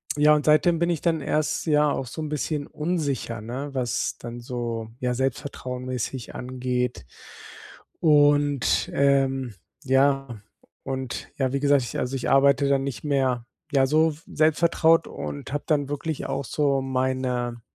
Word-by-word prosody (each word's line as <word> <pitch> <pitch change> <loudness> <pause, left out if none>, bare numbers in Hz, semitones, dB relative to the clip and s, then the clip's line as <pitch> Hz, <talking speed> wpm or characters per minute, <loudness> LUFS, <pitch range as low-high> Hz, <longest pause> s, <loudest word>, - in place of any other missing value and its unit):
ja, 150 +1 +5
und 150 - -1
seitdem 160 +2 +4
bin 170 +1 +1
ich 170 -4 -1
dann 165 -3 +1
erst 155 +1 -1
ja 150 -2 +3
auch 135 - -3
so 160 - -6
'n 155 - -4
bisschen 150 0 -2
unsicher, 145 -9 -2
ne, 125 +6 -5
was 125 -3 -1
dann 120 0 -8
so, 120 -2 -4
ja, 125 -1 0
Selbstvertrauen-mäßig 130 -2 -4
angeht. 125 - -3 1.0
Und, 145 -3 +3
ähm, 135 -3 +2 0.3
ja, 135 -3 +1 0.4
und 130 -2 -5
ja, 130 -2 0
wie 140 - +1
gesagt, 140 -1 +3
ich 120 - -5
also, 125 +2 -2
ich 130 - -2
arbeite 140 0 +4
dann 135 -1 +2
nicht 135 -6 -5
mehr, 130 -5 0 0.3
ja 135 -2 +4
so 155 +3 +3
selbst 155 0 +2
vertraut 165 -1 +3
und 140 -2 -6
habe 145 +1 -2
dann 145 -3 +1
wirklich 145 +1 -3
auch 135 0 -3
so 140 -2 +1
meine, 130 -2 -1
135 Hz, 150 wpm, -25 LUFS, 125-150 Hz, 1.0 s, ja